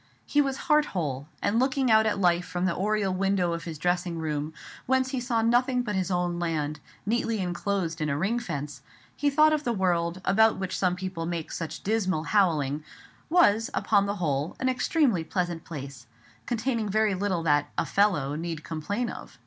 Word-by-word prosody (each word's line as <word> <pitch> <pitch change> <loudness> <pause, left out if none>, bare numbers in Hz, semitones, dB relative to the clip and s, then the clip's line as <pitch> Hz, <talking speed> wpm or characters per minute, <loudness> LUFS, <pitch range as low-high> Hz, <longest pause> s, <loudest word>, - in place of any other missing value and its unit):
He 290 - +3
was 270 -1 -1
heart 300 0 +4
whole; 140 -4 -2 0.2
and 220 +3 +2
looking 260 -1 +2
out 220 0 +5
at 210 - 0
life 180 -1 +2
from 180 0 -2
the 185 - +1
oriel 205 -1 0
window 185 -2 +1
of 170 - -5
his 165 -2 -5
dressing 175 +1 -1
room, 155 -1 -2 0.4
whence 260 0 +2
he 265 - -1
saw 235 -2 0
nothing 250 +2 +2
but 210 -3 -3
his 190 -2 -1
own 175 -1 0
land, 155 -3 -2 0.3
neatly 230 +1 0
enclosed 180 -2 -2
in 155 - 0
a 140 - 0
ring 205 +9 0
fence, 145 -10 -5 0.3
he 290 - +1
thought 305 +2 +5
the 245 - 0
world, 175 -4 0
about 220 +2 +4
which 190 -1 -3
some 180 -2 +1
people 180 -3 -4
made 170 -2 -4
such 160 -1 -5
dismal 190 -6 0
howling, 155 -8 +1 0.5
was, 225 - +4
upon 200 -2 +2
the 200 - -1
whole, 150 -4 -1
an 260 - +1
extremely 250 - +2
pleasant 175 -1 -2
place, 135 -6 -8 0.4
containing 230 -2 -1
very 215 0 +2
little 185 -3 -1
that 145 -2 +2
"a - - +1
fellow" 180 -9 +2
need 160 0 -4
complain 200 +9 -3
of. - - -9
185 Hz, 185 wpm, -27 LUFS, 165-225 Hz, 0.5 s, out